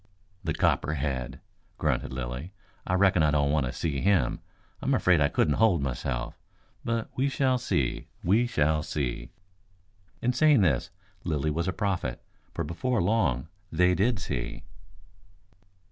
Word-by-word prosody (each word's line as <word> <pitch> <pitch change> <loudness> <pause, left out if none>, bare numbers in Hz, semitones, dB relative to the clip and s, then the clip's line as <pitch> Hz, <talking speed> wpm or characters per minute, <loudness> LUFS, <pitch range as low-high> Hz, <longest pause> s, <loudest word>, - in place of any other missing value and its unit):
"The - - -1
copperhead!" 65 -4 -1 0.4
grunted - - -1
Lilly. 65 +7 -5 0.3
"I 90 - +1
reckon 95 -2 +4
I 75 - +4
don't 70 -1 +2
want 75 -4 +1
to - - -3
see 70 -3 -2
him. 100 -2 +2 0.4
I'm - - +2
afraid 90 -4 +3
I 70 - +5
couldn't 75 - +1
hold 95 -10 +4
myself. 65 -1 -3 0.4
But 115 -1 -2
we 135 +2 +1
shall 130 -2 +1
see, 70 - -1 0.2
we 110 +7 +3
shall 75 -7 +1
see." 75 -5 -3 0.9
In 125 +1 +1
saying 145 -2 +5
this 75 -10 +2 0.3
Lilly 75 -2 0
was 85 +4 -1
a - - +1
prophet, 90 - -2 0.3
for - - -3
before 120 - -1
long 85 - +1 0.2
they 90 0 +3
did 105 +6 +2
see. 70 -9 -4
85 Hz, 145 wpm, -28 LUFS, 70-100 Hz, 0.9 s, I